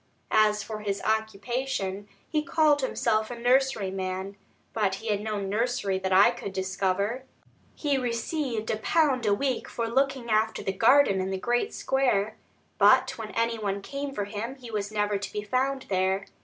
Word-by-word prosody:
As 215 0 +4
for 215 -1 -6
his 200 -1 -2
occupation 220 -1 -2 0.2
he 305 - 0
called 300 -1 +3
himself 220 -4 0
a 245 - -5
nurseryman, 200 -7 0 0.4
but 205 -4 +1
he 220 +3 -6
had 205 -1 0
no 215 -1 -2
nursery 200 -1 -1
that 190 0 -2
I 190 +2 +7
could 195 - -7
discover. 195 +4 -1 0.5
He 285 -3 0
received 240 -1 -2
a 215 - -1
pound 265 -1 +2
a 205 - +4
week 260 +1 -2
for 230 -1 -3
looking 265 +1 0
after 220 +1 +1
the 195 - 0
garden 225 -2 +4
in 190 - -2
the 190 - -2
great 240 - 0
square; 245 -6 0 0.4
but - - +5
when 220 -1 -5
any 230 0 0
one 200 -1 -2
came 280 +4 -4
for 205 -7 -3
him, 220 +5 -5
he 250 -4 -11
was 205 -1 -3
never 205 -1 0
to 200 - -5
be 210 - -4
found 265 +5 0
there. 190 0 0
220 Hz, 170 wpm, -27 LUFS, 200-255 Hz, 0.5 s, I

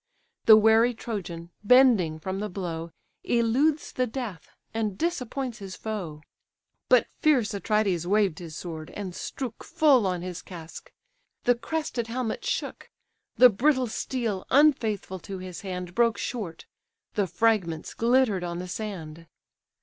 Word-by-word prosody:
The 220 -1 +9
wary 220 +2 +5
Trojan, 175 -7 -6
bending 220 -9 +5
from 190 +4 -4
the 210 +1 -3
blow, 170 -3 -5 0.3
Eludes 255 +7 +1
the 255 0 0
death, 220 - -6 0.2
and 215 -4 -2
disappoints 265 -7 -2
his 195 -2 -7
foe: 185 -9 -5 0.7
But - - +6
fierce 265 -10 +3
Atrides 200 -4 0
waved 200 -4 +2
his 165 -3 -8
sword, 160 -3 -7
and 195 -3 -5
strook 245 +4 -6
Full 270 -9 +4
on 180 -2 -2
his 180 -1 -5
casque: 165 -3 -10 0.5
the 245 - +5
crested 245 -1 -3
helmet 235 -1 -3
shook; - - -3 0.5
The 250 - +8
brittle 260 +5 +2
steel, 225 -4 -3
unfaithful 225 -10 +2
to 190 +3 -7
his 185 -2 -8
hand, 180 -2 -5
Broke 235 +2 +3
short: 205 -10 -5 0.5
the 205 -2 0
fragments 180 -4 0
glitter'd 235 -5 +2
on 170 -1 -3
the 180 +1 -5
sand. 170 -5 -6
210 Hz, 135 wpm, -27 LUFS, 180-245 Hz, 0.7 s, The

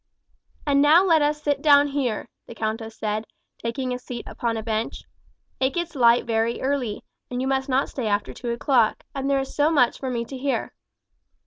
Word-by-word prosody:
"And 280 -1 +3
now 310 +5 +6
let 325 -4 +4
us 300 +1 0
sit 285 -2 0
down 285 -1 +6
here," 265 -6 -2 0.2
the 235 - -10
countess 220 +1 -3
said, 215 0 -2 0.3
taking 250 +2 -3
a 250 - -4
seat 245 -1 -7
upon 230 -1 -2
a 220 - -4
bench. 220 0 -3 0.6
"It 265 0 +1
gets 345 -1 -2
light 240 -4 +4
very 230 0 0
early, 260 -6 -2 0.3
and 245 - -3
you 260 - -1
must 265 0 0
not 265 +1 +2
stay 250 -5 -4
after 205 0 -1
two 245 - -6
o'clock, 235 -1 +2
and 275 0 -2
there 275 -1 +3
is 270 - -5
so 295 +1 +3
much 275 -7 +3
for 265 - -3
me 235 -2 -2
to 265 - -8
hear." 275 0 -2
255 Hz, 200 wpm, -24 LUFS, 230-280 Hz, 0.6 s, now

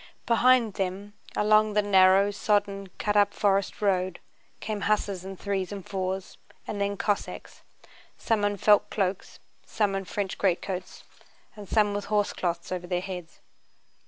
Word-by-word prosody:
Behind 235 -2 +4
them 195 +1 -4 0.2
along 215 0 +3
the 210 0 +2
narrow, 195 0 +5
sodden, 200 -1 0
cut 210 0 -1
up 205 0 +3
forest 200 0 0
road 185 -2 +1 0.4
came 210 -2 -4
hussars 200 -2 0
in 190 0 -8
threes 195 -1 -2
and 200 -2 -7
fours, 190 -1 -4 0.3
and 205 - -4
then 200 0 -1
Cossacks: 200 0 -3 0.6
some 220 -2 0
in 205 0 0
felt 205 +2 +4
cloaks, 190 -2 -2 0.3
some 210 -3 -1
in 195 0 -3
French 195 0 -4
greatcoats, 185 -1 -2 0.5
and 205 -2 -11
some 210 -2 +2
with 205 0 -3
horsecloths 185 -5 -1
over 180 -1 -4
their 180 0 0
heads. 180 -3 -8
200 Hz, 145 wpm, -27 LUFS, 190-205 Hz, 0.6 s, narrow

